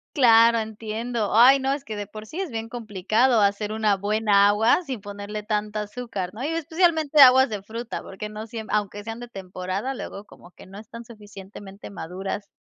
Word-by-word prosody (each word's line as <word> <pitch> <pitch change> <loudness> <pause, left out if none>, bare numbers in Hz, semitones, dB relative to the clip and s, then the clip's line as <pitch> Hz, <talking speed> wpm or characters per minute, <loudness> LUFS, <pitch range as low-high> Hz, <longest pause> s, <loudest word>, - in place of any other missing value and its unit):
Claro, 230 -3 +6
entiendo. 220 +1 -4
Ay, 260 +4 +7
no, 265 +1 -1
es 280 0 -3
que 215 - -6
de 205 -1 -5
por 215 0 -10
sí 315 - -8
es 370 - -4
bien 225 -1 -5
complicado 225 +1 +1
hacer 205 +1 0
una 215 -2 +1
buena 205 0 +3
agua 220 - +3
sin 260 - -6
ponerle 205 +1 -7
tanta 210 0 -2
azúcar, 210 -4 -6
¿no?, 225 +4 -7
y 290 - -1
especialmente 320 -2 +2
aguas 260 0 +8
de 210 -2 -5
fruta, 225 +4 -6
porque 195 +2 -8
no 215 +1 -8
siem 220 -1 -7
aunque 205 -1 -2
sean 225 +1 -7
de 240 - -8
temporada, 190 +3 -5
luego 210 -5 -8
como 175 - -17
que - - -16
no 195 +2 -11
están 230 +2 -11
suficientemente 205 -2 -12
maduras. 190 +3 -6
215 Hz, 190 wpm, -24 LUFS, 205-240 Hz, -, aguas